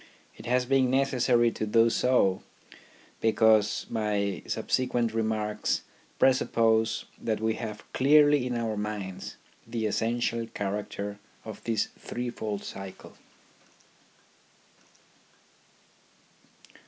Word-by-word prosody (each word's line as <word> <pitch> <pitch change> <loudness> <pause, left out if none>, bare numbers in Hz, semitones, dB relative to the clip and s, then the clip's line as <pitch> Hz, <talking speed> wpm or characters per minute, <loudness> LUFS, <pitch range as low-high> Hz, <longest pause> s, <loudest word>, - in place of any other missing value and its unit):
It - - -11
has 125 +1 +2
been 130 0 +3
necessary 125 -3 +3
to 110 - -4
do 115 +2 +4
so 115 -7 +2 0.8
because 110 -2 +3
my 105 -3 -1
subsequent 120 -3 0
remarks 110 -1 -1 0.3
presuppose 110 -3 +2 0.2
that 110 -2 -1
we 110 0 0
have 110 -2 -6
clearly 145 -1 +5
in 125 -1 -2
our 115 -2 -2
minds 105 -3 -5 0.3
the 115 -1 -2
essential 115 +2 -1
character 100 -1 -4 0.3
of 110 -2 -9
this 115 -3 0
threefold 110 -4 -4
cycle. 95 -1 -9
110 Hz, 90 wpm, -28 LUFS, 105-120 Hz, 0.8 s, clearly